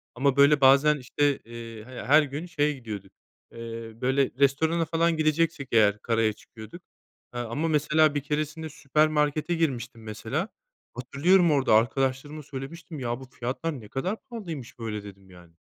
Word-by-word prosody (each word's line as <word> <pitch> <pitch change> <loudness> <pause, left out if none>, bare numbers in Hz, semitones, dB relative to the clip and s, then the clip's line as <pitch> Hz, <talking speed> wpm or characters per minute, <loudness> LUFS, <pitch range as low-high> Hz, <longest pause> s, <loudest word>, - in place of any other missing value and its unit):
Ama 135 +1 +2
böyle 140 0 +6
bazen 140 +3 +6
işte, 140 +2 0
eee, 115 -1 -10
h 130 -1 -8
her 150 +4 +6
gün 145 +4 -5
şeye 150 -3 0
gidiyorduk, 105 -7 -8 0.4
eee, 115 -1 -7
böyle 130 +1 +2
restorana 160 +4 +2
falan 165 +1 +1
gideceksek 155 -2 +1
eğer 105 -2 +4
karaya 115 -2 +1
çıkıyorduk. 110 - -13 0.5
Eee, 120 - -4
ama 120 +8 -2
mesela 150 0 +3
bir 145 - 0
keresinde 155 +2 -3
süpermarkete 150 +2 +1
girmiştim 125 -8 -2
mesela. 110 -1 -4 0.4
Hatırlıyorum 160 +8 +3
orada 135 -6 +3
arkadaşlarıma 135 +6 0
söylemiştim, 150 +4 -8
ya 120 0 -3
bu 130 - -10
fiyatlar 130 +4 -4
ne 105 - -12
kadar 180 - -3
pahalıymış 165 - -7
böyle, 105 -2 -4
dedim 100 -1 -13
yani. 90 -2 -16
140 Hz, 150 wpm, -26 LUFS, 115-155 Hz, 0.5 s, böyle